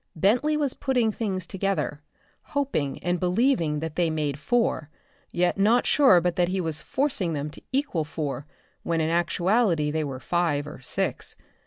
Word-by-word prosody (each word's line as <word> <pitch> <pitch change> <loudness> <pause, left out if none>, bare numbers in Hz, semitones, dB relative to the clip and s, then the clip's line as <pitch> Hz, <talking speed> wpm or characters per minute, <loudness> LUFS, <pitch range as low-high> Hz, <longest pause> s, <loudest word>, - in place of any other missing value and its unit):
Bentley 245 - +2
was 285 -4 +1
putting 250 -5 +1
things 195 -5 -3
together, 190 -6 -2 0.4
hoping 270 - -2
and 175 0 0
believing 180 - +1
that 160 -1 -4
they 175 -2 +2
made 150 -3 -2
four 195 -4 0 0.4
yet 180 +2 +1
not 225 +5 +4
sure 265 -12 +6
but 175 0 -1
that 175 -1 +3
he 190 +2 -1
was 160 -4 -2
forcing 255 - 0
them 150 0 -3
to - - -11
equal 265 - 0
four 150 -2 -4 0.3
when 165 -1 -1
in 160 0 +1
actuality 175 -1 +2
they 155 0 -1
were 135 -3 -5
five 150 0 0
or 150 - -9
six. 125 - -2
175 Hz, 165 wpm, -26 LUFS, 155-225 Hz, 0.4 s, sure